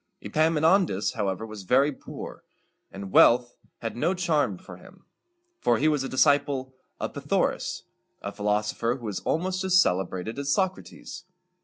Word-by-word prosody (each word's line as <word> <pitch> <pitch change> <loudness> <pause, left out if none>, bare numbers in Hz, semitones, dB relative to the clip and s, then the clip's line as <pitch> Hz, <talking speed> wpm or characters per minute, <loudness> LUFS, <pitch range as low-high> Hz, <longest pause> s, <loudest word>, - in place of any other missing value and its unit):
Epaminondas, 160 - +2
however, 100 0 -2
was 110 -2 -8
very 135 +9 +3
poor; 135 - -9 0.5
and 95 0 -8
wealth 120 0 +5 0.3
had 115 - -4
no 175 +10 0
charms 155 - 0
for - - -12
him, - - -17 0.5
for 120 - +2
he 150 - +2
was 150 -3 +1
a 135 - -4
disciple 140 -1 +2 0.3
of - - -4
Py - - -6
tha´o - - +2
ras, - - -6 0.4
a 100 - -4
philosopher 105 +3 -1
who 125 -3 -10
was 105 -3 -3
almost 185 +3 -1
as 185 -1 +4
celebrated 95 - 0
as 140 0 -1
Socrates. 190 0 -3
130 Hz, 155 wpm, -26 LUFS, 105-155 Hz, 0.5 s, wealth